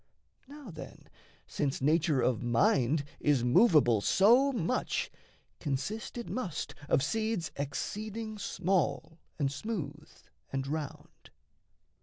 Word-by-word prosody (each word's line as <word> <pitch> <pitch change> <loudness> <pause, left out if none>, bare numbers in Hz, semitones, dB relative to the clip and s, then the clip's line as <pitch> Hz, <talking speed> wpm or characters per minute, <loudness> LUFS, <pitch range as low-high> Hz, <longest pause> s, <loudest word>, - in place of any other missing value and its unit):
Now, 285 -6 -10
then, 160 - -11 0.4
Since 140 -2 -2
nature 155 -1 +2
of 125 -2 +1
mind 120 +4 +2 0.2
is 140 -5 +2
movable 125 - +5
so 235 - +5
much, 245 0 -1 0.5
Consist 175 - -3
it 235 - -5
must 185 -12 -4 0.2
of 135 - +3
seeds 220 -1 -1
exceeding 215 +9 -4
small 165 -6 -1 0.2
And 140 -3 0
smooth 150 -3 -5 0.4
and 135 0 -2
round. 150 0 -6
160 Hz, 105 wpm, -31 LUFS, 140-215 Hz, 0.5 s, movable